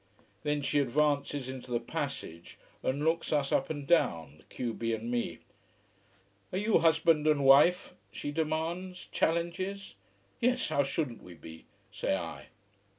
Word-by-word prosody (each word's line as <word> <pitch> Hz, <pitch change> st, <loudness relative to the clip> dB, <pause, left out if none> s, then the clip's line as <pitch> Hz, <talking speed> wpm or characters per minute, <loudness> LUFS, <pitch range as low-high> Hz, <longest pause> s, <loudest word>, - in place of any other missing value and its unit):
Then 150 Hz, -1 st, -1 dB
she 145 Hz, -, +2 dB
advances 140 Hz, 0 st, +1 dB
into 130 Hz, -1 st, -7 dB
the 120 Hz, -1 st, 0 dB
passage 130 Hz, -, -5 dB, 0.2 s
and 140 Hz, +3 st, -1 dB
looks 165 Hz, +1 st, 0 dB
us 145 Hz, -3 st, +1 dB
up 135 Hz, -, +1 dB
and 145 Hz, -3 st, -4 dB
down, 80 Hz, -, +1 dB
the -, -, -20 dB
q 120 Hz, -2 st, -4 dB
b 115 Hz, 0 st, -1 dB
and 115 Hz, +2 st, -5 dB
me. 120 Hz, -1 st, -2 dB, 1.1 s
"Are 185 Hz, -, -2 dB
you 210 Hz, +2 st, +3 dB
husband 160 Hz, -1 st, +3 dB
and 145 Hz, -3 st, +3 dB
wife?" 145 Hz, +7 st, +6 dB, 0.2 s
she 145 Hz, -, -5 dB
demands, 165 Hz, +4 st, -2 dB
challenge. 180 Hz, -, -1 dB, 0.5 s
"Yes, 250 Hz, +1 st, +1 dB
how 140 Hz, -, +2 dB
shouldn't 135 Hz, -3 st, -2 dB
we 90 Hz, -1 st, -12 dB
be," 80 Hz, +1 st, -12 dB, 0.3 s
say -, -, -1 dB
I. -, -, -7 dB
145 Hz, 150 wpm, -30 LUFS, 125-165 Hz, 1.1 s, wife